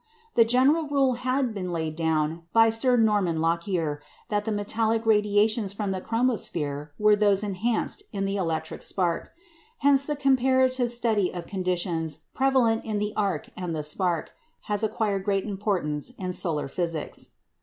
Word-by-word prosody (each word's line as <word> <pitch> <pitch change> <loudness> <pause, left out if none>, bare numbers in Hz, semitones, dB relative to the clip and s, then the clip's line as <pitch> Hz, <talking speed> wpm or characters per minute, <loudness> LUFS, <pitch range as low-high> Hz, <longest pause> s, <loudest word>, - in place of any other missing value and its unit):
The 230 - +6
general 270 +7 +3
rule 275 -3 +2
had 255 0 -1
been 185 -3 -4
laid 160 -2 -2
down 160 0 0
by 225 0 +6
Sir 245 +3 +2
Norman 205 -7 +2
Lockyer 165 -2 -1 0.3
that 210 -1 0
the 220 - -1
metallic 220 +2 0
radiations 210 -1 +2
from 205 -1 -2
the 190 -1 -3
chromosphere 170 - -1
are 210 0 +5
those 205 -1 +3
"enhanced" 215 - -1
in 195 -3 -2
the 195 0 -1
electric 165 -4 -3
spark. 175 -3 -1 0.5
Hence, 280 -1 +4
the 295 - -2
comparative 260 -2 +2
study 225 -5 +1
of 175 -2 -6
conditions 175 -4 -2
prevalent 255 -4 +2
in 215 -2 -2
the 210 0 -2
arc 195 -7 -1
and 180 -3 -4
the 155 - -3
spark 170 +2 -1 0.3
has 205 -1 -2
acquired 205 -3 0
great 195 -1 0
importance 195 -6 -2
in 185 -2 -4
solar 160 -6 -1
physics. 165 +1 -4
205 Hz, 155 wpm, -26 LUFS, 175-230 Hz, 0.5 s, The